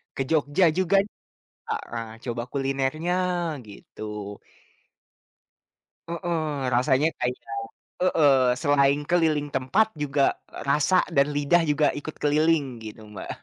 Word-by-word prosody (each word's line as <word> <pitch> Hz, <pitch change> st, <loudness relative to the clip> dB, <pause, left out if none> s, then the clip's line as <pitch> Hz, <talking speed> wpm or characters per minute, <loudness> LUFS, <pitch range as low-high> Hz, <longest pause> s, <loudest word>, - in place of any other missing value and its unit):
Ke -, -, -2 dB
Jogja 155 Hz, +2 st, +2 dB
juga 185 Hz, +1 st, +2 dB
nih 210 Hz, -, -19 dB, 0.5 s
Kak, -, -, -2 dB
eee, 115 Hz, -1 st, -4 dB, 0.2 s
coba 120 Hz, -1 st, -3 dB
kulinernya, 135 Hz, +4 st, -1 dB, 0.6 s
gitu. 100 Hz, -, -14 dB, 2.1 s
Heeh, 160 Hz, -5 st, -2 dB
rasanya 130 Hz, +4 st, +3 dB
kayak 125 Hz, 0 st, -1 dB, 0.7 s
heeh, 160 Hz, -6 st, +4 dB, 0.3 s
selain 145 Hz, 0 st, +3 dB
keliling 160 Hz, -4 st, +2 dB
tempat 190 Hz, +12 st, +2 dB, 0.2 s
juga, 145 Hz, -1 st, +1 dB, 0.4 s
rasa 150 Hz, +6 st, +3 dB
dan 140 Hz, +1 st, +3 dB
lidah 145 Hz, +4 st, +3 dB
juga 150 Hz, 0 st, +3 dB
ikut 155 Hz, +2 st, -7 dB
keliling 155 Hz, +1 st, +3 dB, 0.2 s
gitu 110 Hz, 0 st, -9 dB
Mbak. 105 Hz, -2 st, -9 dB
145 Hz, 110 wpm, -25 LUFS, 135-160 Hz, 2.1 s, heeh